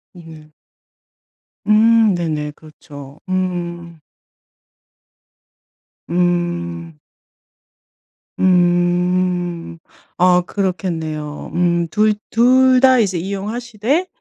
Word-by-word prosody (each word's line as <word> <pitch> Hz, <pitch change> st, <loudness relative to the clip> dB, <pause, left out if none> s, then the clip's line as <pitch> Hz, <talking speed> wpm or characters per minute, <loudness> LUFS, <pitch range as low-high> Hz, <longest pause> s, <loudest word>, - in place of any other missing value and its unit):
으네. 160 Hz, -3 st, -14 dB, 1.1 s
음. 220 Hz, 0 st, +4 dB
네네 155 Hz, -3 st, -3 dB
그렇죠. 145 Hz, -2 st, -14 dB
음. 175 Hz, -3 st, -4 dB, 2.1 s
음. 175 Hz, -2 st, -2 dB, 1.4 s
음. 175 Hz, -1 st, +1 dB, 0.4 s
어 180 Hz, 0 st, +4 dB
그렇겠네요. 165 Hz, -6 st, -4 dB
음 170 Hz, -1 st, +1 dB
2- 215 Hz, +3 st, +2 dB, 0.2 s
2 255 Hz, +2 st, +4 dB
다 260 Hz, -2 st, +5 dB
이제 190 Hz, -5 st, 0 dB
이용하시되 220 Hz, -, -3 dB
175 Hz, 110 characters per minute, -18 LUFS, 170-205 Hz, 2.1 s, 다